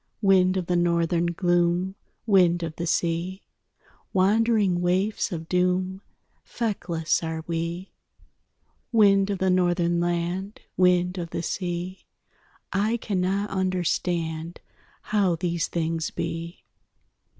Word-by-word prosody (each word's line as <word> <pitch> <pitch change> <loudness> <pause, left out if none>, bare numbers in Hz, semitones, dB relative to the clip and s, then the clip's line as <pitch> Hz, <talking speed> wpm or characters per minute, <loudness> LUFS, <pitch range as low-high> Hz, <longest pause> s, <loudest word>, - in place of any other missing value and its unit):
Wind 190 -1 +4
of 185 - -1
the 180 - 0
Northern 170 0 +2
gloom, 175 +1 +1 0.3
Wind 180 -5 +4
of 160 -1 -4
the 170 - -3
sea, 170 +3 -1 0.7
Wandering 200 -1 +3
waifs 190 +5 0
of 165 -2 -5
doom 185 +1 0 0.4
Feckless 175 -8 -1
are 160 -1 -4
we. 170 +3 -4 1.0
Wind 200 -3 +4
of 200 - -1
the 190 0 +1
Northern 175 -1 +2
land, 175 +4 -2 0.2
Wind 180 0 +3
of 170 -1 -4
the 165 - -4
sea, 180 +1 -4 0.7
I 210 +4 +1
cannot 200 -1 -1
understand 175 -3 -1 0.4
How 200 -5 +1
these 170 -1 -1
things 165 -1 -2
be. 165 +1 -5
180 Hz, 110 wpm, -25 LUFS, 170-190 Hz, 1.0 s, Wind